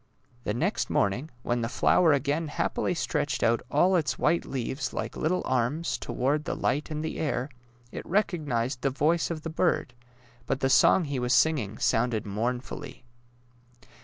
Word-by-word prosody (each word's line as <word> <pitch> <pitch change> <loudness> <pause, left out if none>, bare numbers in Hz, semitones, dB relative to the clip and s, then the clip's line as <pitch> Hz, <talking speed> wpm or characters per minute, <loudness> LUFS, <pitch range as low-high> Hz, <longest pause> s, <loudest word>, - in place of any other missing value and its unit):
The 105 - 0
next - - -1
morning, 120 +10 0
when 120 0 0
the 115 - -2
flower 165 +5 +4
again 145 +3 0
happily 145 - -1
stretched - - -1
out 115 0 +3
all 180 +6 +3
its 155 -7 0
white 170 - +1
leaves 130 +2 -3
like - - -4
little 180 +4 0
arms 130 +7 0
toward 145 +4 -1
the - - -2
light 150 +4 -1
and 155 0 -3
the - - -4
air, 145 -3 -1 0.4
it - - -6
rec 205 +5 +1
ognized 130 -7 -2
the 135 - +2
voice 155 +5 +1
of 160 -3 -4
the 165 - -4
bird, 160 -6 0 0.5
but 135 - 0
the 135 -1 +1
song 180 - +5
he 140 -4 -3
was 125 0 +2
singing 120 -10 +2
sounded 120 -4 +1
mournfully. 125 +6 -4
140 Hz, 165 wpm, -27 LUFS, 125-160 Hz, 0.5 s, song